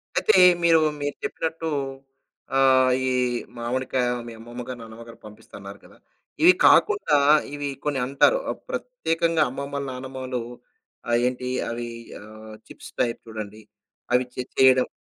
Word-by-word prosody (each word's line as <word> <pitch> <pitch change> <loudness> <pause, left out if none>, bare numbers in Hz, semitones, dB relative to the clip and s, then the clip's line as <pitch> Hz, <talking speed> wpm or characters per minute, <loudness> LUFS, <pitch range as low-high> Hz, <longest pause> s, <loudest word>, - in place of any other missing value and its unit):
అయితే 220 - +3 0.3
మీరు, 165 -1 +5 0.2
మీరు 145 0 -3
చెప్పినట్టు 165 0 -3 0.9
ఆహ్, 130 -1 +4 0.2
ఈ - - +2 0.5
మామిడికాయ 125 +1 -1 0.2
మీ 115 - -8
అమ్మమ్మగారు, 120 +2 -8
నాన్నమ్మగారు 115 +1 -12
పంపిస్తారన్నారు 100 -1 -12
కదా! - - -18 0.5
ఇవి 360 +2 +8
కాకుండా 405 - +4 0.4
ఇవి 145 -1 -4
కొన్ని 145 -2 -1
అంటారు. 140 - +3
ఆహ్, - - -4
ప్రత్యేకంగా 165 - -1
అమ్మమ్మలు 140 +2 -5
నానమ్మలు 130 0 -5 0.7
ఆహ్, 120 - +3
ఏంటి 125 0 -4 0.2
అవి 120 0 -5 0.3
ఆహ్, 110 +1 -12 0.2
చిప్స్ - - -12
టైప్ 115 -1 -1
చూడండి. 110 -1 -8 0.5
అవి 125 +1 +3
చే 125 - -3
చేయడం. 130 -1 +5
130 Hz, 125 wpm, -24 LUFS, 115-145 Hz, 0.9 s, ఇవి